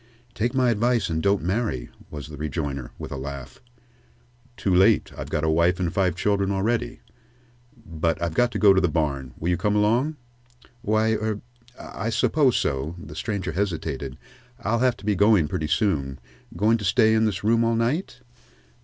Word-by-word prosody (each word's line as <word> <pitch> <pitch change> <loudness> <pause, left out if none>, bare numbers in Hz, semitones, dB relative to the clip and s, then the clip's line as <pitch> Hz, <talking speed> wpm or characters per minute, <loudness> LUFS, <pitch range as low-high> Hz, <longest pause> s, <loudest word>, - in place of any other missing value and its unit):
"Take 120 +3 -1
my 125 -2 +3
advice, 115 -3 +1
and 80 0 -1
don't 100 -2 +1
marry," 90 - -2 0.2
was 75 0 -8
the 75 - -8
rejoinder, 70 -4 -4
with - - -8
a 70 - -4
laugh. 70 -1 -7 1.0
"Too 95 - 0
late 95 +4 +4
I've - - -7
got 75 - -1
a - - +1
wife 85 +3 +2
and 85 -3 -1
five 95 -3 +1
children 100 +1 0
already. 115 +5 -1 0.8
But 80 0 -1
I've 85 -1 -2
got 120 +6 +2
to - - -1
go 100 -2 +6
to 95 - +3
the 90 - +3
barn. 70 -5 -2
Will 85 - -2
you 90 - +2
come 105 +3 0
along?" 120 +9 +2 0.7
"Why 110 0 +2
er 110 -1 -2 0.4
I 105 +3 -5
suppose 125 +3 +2
so." 70 +4 -2
The 80 -3 -10
stranger 100 -3 -3
hesitated. 80 -7 -3 0.4
"I'll 115 +1 0
have 125 -2 +2
to 100 - -13
be 105 - +2
going 100 -4 +4
pretty 75 +1 -2
soon. 70 - 0 0.4
Going 110 +5 +3
to - - -6
stay 110 +3 +4
in 110 0 +3
this 105 -2 -2
room 115 +2 +3
all 115 0 +2
night?" 125 +4 -1
100 Hz, 180 wpm, -24 LUFS, 80-115 Hz, 1.0 s, go